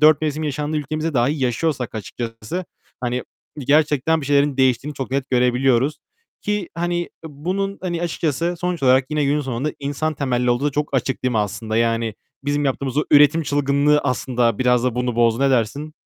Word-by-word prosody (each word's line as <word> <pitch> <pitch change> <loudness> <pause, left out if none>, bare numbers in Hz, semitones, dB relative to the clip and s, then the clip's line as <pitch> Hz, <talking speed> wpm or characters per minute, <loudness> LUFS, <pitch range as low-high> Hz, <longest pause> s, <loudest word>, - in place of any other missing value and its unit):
4 155 0 +6
mevsim 155 0 -1
yaşandığı 150 +1 -2
ülkemizde 155 +1 -2
dahi 135 +4 +1
yaşıyorsak 125 +1 -1
açıkçası, 115 - -5 0.4
hani, 125 0 -1 0.4
gerçekten 150 +2 +2
bir 135 - -6
şeylerin 145 -1 +2
değiştiğini 130 +3 +1
çok 135 -2 -5
net 135 -1 -2
görebiliyoruz 125 +2 +2 0.4
ki, 210 -3 -1
hani, 175 +1 -1
e, - - -8 0.2
bunun, 185 +7 -3
hani 175 -2 -2
açıkçası 170 0 -1
sonuç 180 -3 -2
olarak 130 0 +5
yine 150 -1 +1
günün 145 +2 +1
sonunda 135 +2 -2
insan 145 +2 -2
temelli 125 -3 0
olduğu 120 +3 +1
da 145 - +2
çok 150 +2 -1
açık, 130 0 -1
değil 125 - +1
mi, 110 - +1
aslında? 105 +2 -2
Yani 115 -1 +1 0.3
bizim 145 0 0
yaptığımız 135 -1 -2
o 150 - +3
üretim 150 +2 +6
çılgınlığı 145 +1 +2
aslında 120 -4 0
biraz 125 -1 +3
da 125 - 0
bunu 125 -1 -1
bozdu. 115 +2 +3
Ne 140 - +4
dersin? 135 +5 0
140 Hz, 180 wpm, -21 LUFS, 125-150 Hz, 0.4 s, 4